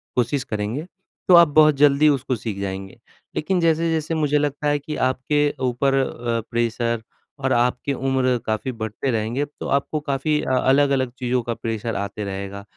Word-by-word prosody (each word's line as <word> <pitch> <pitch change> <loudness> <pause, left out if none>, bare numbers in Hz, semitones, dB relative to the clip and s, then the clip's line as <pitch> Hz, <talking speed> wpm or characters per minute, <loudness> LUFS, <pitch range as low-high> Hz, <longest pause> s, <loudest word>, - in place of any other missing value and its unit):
कोशिश 125 +2 0
करेंगे, 110 +8 -3 0.4
तो 185 - +6
आप 170 -1 +8
बहुत 155 0 +5
जल्दी 145 +1 +5
उसको 130 -2 0
सीख 105 -3 -5
जाएँगे। 95 0 -5 0.4
लेकिन 180 +4 0
जैसे-जैसे 165 -1 +1
मुझे 150 -1 +2
लगता 145 0 -1
है 145 0 +2
कि 150 +2 -6
आपके 145 +3 +1 0.2
ऊपर 135 +3 0
अ, 120 -3 -1
प्रेशर 115 0 0 0.4
और 130 - +2
आपकी 125 +3 +1
उम्र 130 -1 +1
काफ़ी 110 +4 -2
बढ़ते 110 +3 -4
रहेंगे, 115 +5 -1
तो 145 - -9
आपको 150 +2 -3
काफ़ी 150 +1 0
अ, - - -3
अलग-अलग 135 -1 +2
चीज़ों 125 0 0
का 115 - -2
प्रेशर 115 -1 -4
आता 100 +1 -4
रहेगा। 100 0 -5
130 Hz, 165 wpm, -22 LUFS, 115-145 Hz, 0.4 s, आप